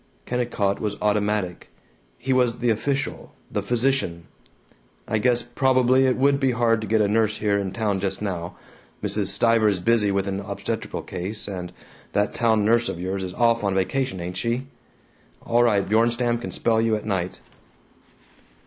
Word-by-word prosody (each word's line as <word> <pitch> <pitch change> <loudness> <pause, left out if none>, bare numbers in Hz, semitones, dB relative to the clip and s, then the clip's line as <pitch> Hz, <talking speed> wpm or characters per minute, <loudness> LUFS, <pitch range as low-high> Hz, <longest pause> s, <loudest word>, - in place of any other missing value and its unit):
Kennicott 120 -5 -1
was 105 -1 -2
automatic; 105 -3 -1 0.5
he 130 +2 -1
was 125 -2 +2
the 120 -1 +1
official, 140 +6 -2 0.2
the - - -1
physician. 120 -9 0 0.8
"I 110 - 0
guess 120 +1 +2
probably 130 +1 +3
it 130 - +1
would 140 +1 +3
be 135 -2 +2
hard 115 -2 +2
to 110 - -5
get 110 +1 +2
a 105 - +3
nurse 110 0 +1
here 100 -1 +1
in 95 -2 -3
town 105 -2 -1
just 95 0 -2
now. 90 -4 -4 0.5
Mrs. 105 -3 0
Stiver 115 +2 +3
is 100 -3 +1
busy 110 +2 +2
with 100 -1 0
an 100 0 -2
obstetrical 100 - -4
case, 100 +5 -4
and 90 -3 -5 0.4
that 105 0 +1
town 110 -3 +2
nurse 120 +2 +3
of 85 - -5
yours 95 +2 -3
is 90 -1 -6
off 115 -2 +2
on 100 -1 0
vacation, 125 +3 -1
ain't 90 +1 -5
she? 120 +5 -1 0.8
All 120 +1 +3
right, 105 -5 +3
Bjornstam 120 +2 +2
can - - -5
spell 115 -1 +1
you 115 -1 +2
at 105 - -5
night." 95 -4 -2
110 Hz, 170 wpm, -24 LUFS, 100-120 Hz, 0.8 s, probably